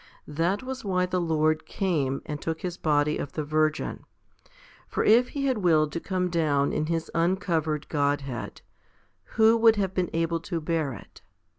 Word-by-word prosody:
That 170 - -1
was 265 0 -6
why 185 -3 +1
the 180 0 -1
Lord 155 -1 +1
came, 150 -9 -1
and 150 -1 -5
took 160 -1 -3
His 180 -2 -3
body 150 -2 +1
of 145 - -5
the 155 - -2
Virgin. 155 +1 -1 0.8
For - - -1
if 235 +3 +5
He 280 -1 -3
had 260 -5 +1
willed 155 -5 +3
to 170 - -3
come 180 0 -2
down 150 -4 +1
in 155 - -1
His 165 -1 -2
uncovered 165 -3 0
Godhead, 140 -4 -2 0.8
who 220 0 +6
would 225 -1 +6
have 195 -3 -1
been 185 -2 0
able 165 0 0
to 165 +1 -4
bear 155 -3 -1
it 105 - -13
165 Hz, 170 wpm, -26 LUFS, 150-185 Hz, 0.8 s, who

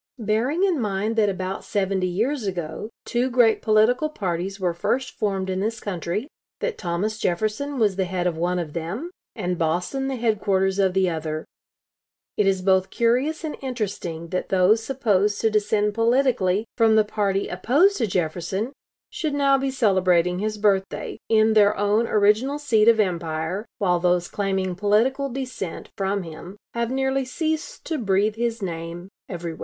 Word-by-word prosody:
"Bearing 235 - 0
in 365 -6 +2
mind 210 +1 -1
that 210 -2 +4
about 185 0 -4
seventy 195 -2 0
years 225 +6 -1
ago 175 +2 -4 0.2
two 245 +2 0
great 240 -3 +4
political 225 +7 +3
parties 190 - -3
were 180 -2 0
first 220 +9 -1
formed 195 -2 -2
in 185 0 -2
this 220 +3 -2
country; 190 - -3 0.3
that 485 - -2
Thomas 200 +4 -2
Jefferson 215 +11 -1
was 210 -5 +2
the 190 - +1
head 180 0 -2
of 175 -2 0
one 175 +2 0
of 165 -4 -4
them, 190 - -4 0.2
and 180 -6 -2
Boston 180 - -1
the 270 - -2
headquarters 200 -4 +1
of 190 -2 +2
the 190 -1 +3
other, 155 -2 -3 0.9
it 205 - +2
is 190 -1 +1
both 190 0 +3
curious 255 +8 +1
and 315 - -3
interesting 200 -10 -4
that 180 +1 -3
those 195 +4 +4
supposed 210 -6 +1
to 225 - +2
descend 210 0 +1
politically 230 -4 +2
from 225 -2 +4
the 215 -1 +4
party 200 -2 -1
opposed 285 - +3
to 230 - 0
Jefferson, 185 - -2 0.4
should 300 -3 -2
now 280 -1 +4
be 270 0 0
celebrating 185 -8 +2
his 215 +1 -2
birthday, 200 -2 0
in 220 0 +4
their 210 -1 +4
own 210 +3 +2
original 215 +7 +2
seat 230 -7 +2
of 230 -1 +6
empire, 175 +1 -1
while 180 -3 +2
those 175 0 +1
claiming 190 -2 -1
political 220 +9 +1
descent 255 -9 -5
from 195 0 -1
him 175 +4 -10 0.2
have 235 0 -1
nearly 265 +1 0
ceased 315 - -3
to 320 - -2
breathe 205 0 +1
his 230 -2 -2
name 170 0 -5 0.2
everywhere...." 170 -3 -5
205 Hz, 165 wpm, -23 LUFS, 185-235 Hz, 0.9 s, of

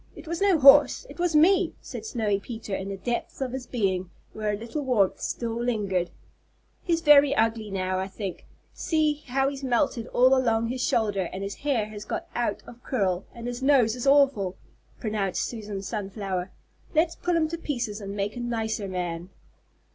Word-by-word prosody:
It - - -12
was 335 +3 -3
no 395 -4 +4
horse. 285 - +7
It - - -13
was 350 -2 +1
me," 360 +3 +4
said 225 -4 -8
Snowy 215 -4 0
Peter 220 -1 -7
in 190 +1 -4
the 195 - -4
depths 240 +4 -3
of 265 -2 -2
his 255 -1 -6
being, 190 -6 -1 0.2
where 215 -1 -2
a 205 - -2
little 230 +7 -5
warmth 225 -8 +2
still 235 -1 -3
lingered. 210 -7 -1 0.7
"He's 335 -2 0
very 290 -3 +6
ugly 225 -1 +1
now, 185 -1 -1
I 190 - -2
think; 195 -1 -6 0.3
see 305 -2 0
how 270 +2 +1
he's 275 0 -4
melted 245 -2 0
all 255 +2 +4
along 230 -3 +1
his 255 +1 -3
shoulder, 205 -7 +1
and 190 +1 -5
his 200 0 -4
hair 270 -7 0
has 210 -1 -8
got - - -4
out 240 0 -2
of 240 0 -13
curl, 195 -8 -1
and 235 0 -8
his 245 +1 -4
nose 260 -5 +4
is 250 +2 -4
awful," 270 -10 +4 0.4
pronounced 210 -4 -1
Susan 210 -4 -5
Sunflower. 195 -3 -4 0.5
"Let's 330 +2 +3
pull 355 -1 -1
him 320 -1 +2
to 335 - -4
pieces 240 -9 -3
and 200 0 -6
make 205 +2 -2
a - - -5
nicer 225 -3 -2
man." 175 -1 -4
230 Hz, 185 wpm, -26 LUFS, 200-270 Hz, 0.7 s, horse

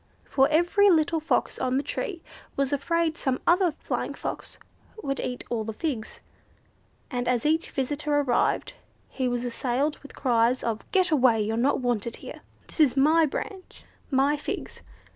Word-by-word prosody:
For 270 -1 +3
every 345 +6 +4
little 325 -2 +3
Fox 315 - 0
on 255 0 0
the 275 - 0
tree 390 -5 -4 0.3
was 275 0 0
afraid 330 +3 0
some 260 -1 0
other 355 0 +4
Flying 310 - -4
Fox - - -6 0.5
would 275 0 -2
eat 250 0 -4
all 230 -2 0
the 220 0 -5
figs, 245 -4 -4 0.9
and 245 -1 -2
as 245 0 +1
each 320 +2 +1
visitor 290 +2 -1
arrived 260 -4 +1 0.4
he 260 -2 -2
was 245 0 -1
assailed 255 +5 -1
with 285 - -14
cries 240 0 +2
of, 225 -2 -3
"Get 370 -2 +3
away 250 -7 +4
you're 215 +1 -1
not 260 +4 +1
wanted 235 -2 -1
here!" - - -10 0.2
"This - - -12
is 285 -4 +4
my 310 +4 +5
branch, 380 +6 -7 0.3
my 280 +2 +2
figs!" 290 - -6
275 Hz, 160 wpm, -26 LUFS, 245-315 Hz, 0.9 s, my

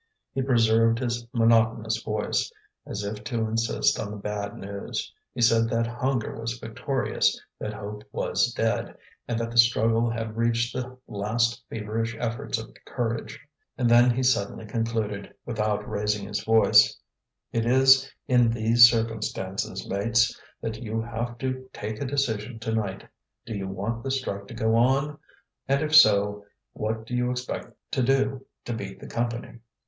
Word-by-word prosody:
He 135 - -1
preserved 115 -3 +3
his 120 -1 -2
monotonous 115 -2 +2
voice, 105 -1 -1 0.4
as 100 - -4
if 105 +1 -5
to 115 0 -2
insist 115 +1 +1
on 100 - -3
the 105 - -6
bad 100 0 -4
news; 100 0 -5 0.2
he 125 - -5
said 115 0 +4
that 115 0 +1
hunger 120 0 -2
was 115 +1 -3
victorious, 130 +4 -1 0.2
that 105 - -4
hope 105 +1 -7
was - - +1
dead, - - -1 0.3
and 115 - -1
that 115 0 -3
the 120 - +2
struggle 115 0 +4
had 115 -1 -4
reached 115 0 +1
the 130 0 -5
last 115 +3 0
feverish 115 +1 -3
efforts 120 +2 -2
of 110 0 -8
courage. 115 -3 -3 0.4
And 125 - +2
then 120 +1 +6
he 125 +2 +1
suddenly 110 -4 +1
concluded, 110 -2 -3
without 105 -3 -1
raising 105 -1 -1
his 105 - -3
voice: 110 -1 +5 0.5
"It 115 0 0
is 135 +2 +5 0.2
in 125 -3 +4
these 115 +1 +7
circumstances, 110 -4 -2
mates, 115 +4 +2 0.3
that 110 -1 -4
you 110 -1 -2
have 120 +1 -4
to 130 +1 -4
take 105 +3 -5
a - - -1
decision 125 -4 -1
to 115 -1 -2
night. 100 -4 -3 0.4
Do 115 - -5
you 100 -1 -3
want 105 +5 -3
the 135 - -3
strike 100 -7 -3
to 115 - -9
go 110 -1 +1
on? 135 +5 +2 0.5
and 140 +2 +2
if 155 0 -2
so, 105 -6 +6 0.3
what 110 +1 -3
do 125 - -4
you 125 0 +1
expect 125 0 -4 0.2
to - - 0
do 135 +1 +1 0.2
to 120 - -3
beat 100 -3 -6
the - - -10
Company?" 120 0 -3
115 Hz, 160 wpm, -26 LUFS, 110-120 Hz, 0.5 s, these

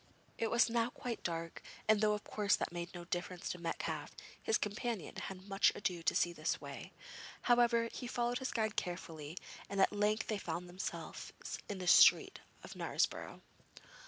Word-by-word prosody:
It 225 - +1
was 235 +1 +5
now 230 0 +1
quite 245 -1 -5
dark, 165 -1 -3 0.3
and 215 -1 +5
though 210 -1 +4
of 210 - -3
course 205 -1 +2
that - - -3
made 175 +1 -5
no 175 0 -7
difference 175 0 -3
to 180 - -4
Metcalfe, 165 -1 -3 0.3
his 445 - +2
companion 210 -2 -3
had 190 0 -6
much 195 0 +4
ado 180 -4 -1
to 165 - +1
see 175 - +2
his 155 -1 -1
way. - - -8 0.5
However, 240 -1 +4
he 250 - -5
followed 240 0 0
his 260 - -2
guide 220 -2 0
carefully 165 -3 -4 0.3
and 200 - -2
at 190 - +5
length 210 +1 +2
they 215 -2 -2
found 175 0 -4
themselves 180 +2 -5 0.4
in 205 - -3
the 185 - -5
streets 175 - +7 0.2
of - - -8
Knaresborough. - - -1
200 Hz, 175 wpm, -35 LUFS, 175-230 Hz, 0.5 s, streets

